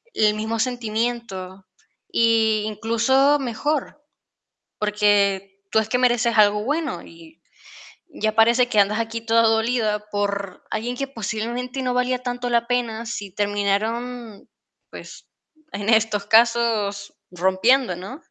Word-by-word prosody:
el 210 -1 +3
mismo 220 +2 -3
sentimiento 220 -5 -3 0.4
y 225 -2 +2
incluso 230 +7 +2
mejor, 290 +4 -3 0.8
porque 200 -2 +1
tú 220 - +4
es 220 0 -3
que 250 - +1
mereces 240 -2 +2
algo 210 0 +4
bueno 295 +2 -2
y 330 -1 -16 0.7
ya 215 0 -2
parece 235 +3 +4
que 215 -4 +1
andas 210 +3 +2
aquí 230 0 -3
toda 230 0 +3
dolida 220 -2 0
por 200 -2 -3
alguien 240 +3 -3
que 275 - -3
posiblemente 240 +2 -4
no 250 -1 -1
valía 250 0 +1
tanto 245 0 -3
la 235 -1 +1
pena 235 -2 -2
si 205 -3 -5
terminaron, 210 +3 -2 0.4
pues - - -12 0.5
en 205 +2 -3
estos 220 -2 +2
casos 225 -3 +2 0.2
rompiendo, 190 +5 +2
¿no? 195 - -8
225 Hz, 125 wpm, -22 LUFS, 210-245 Hz, 0.8 s, tú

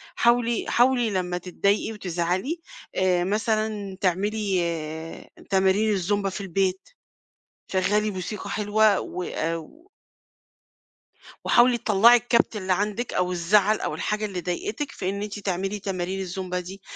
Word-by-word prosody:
حاولي 235 -1 +2
حاولي 245 -1 +3
لمّا 180 -2 -1
تتضايقي 200 +4 0
وتزعلي 185 - -2 0.4
آآ، 180 -2 +2
مثلًا 215 -1 -1
تعملي 195 +1 +1 0.9
تمارين 195 +2 +3
الزومبا 200 +1 0
في 195 - -6
البيت، 190 0 -1 0.8
شغّلي 210 +3 +2
موسيقى 190 +1 -5
حلوة، 210 -1 +3
وآآ، 165 -2 -3
و 310 - -12 1.6
وحاولي 240 0 +5
تطلعي 230 +2 +6
الكبت 235 -1 +1
اللي 190 -2 0
عندِك 210 +5 -2
أو 180 0 0
الزعل 200 +5 +3
أو - - -2
الحاجة 210 0 -1
اللي 190 -4 -4
ضايقتك، 210 - -3
في 185 -7 -3
إن 200 +1 -3
أنتِ 210 0 -5
تعملي 195 +1 -2
تمارين 190 -1 -3
الزومبا 185 -1 -3
دي 190 +2 -9
200 Hz, 125 wpm, -25 LUFS, 185-215 Hz, 1.6 s, تطلعي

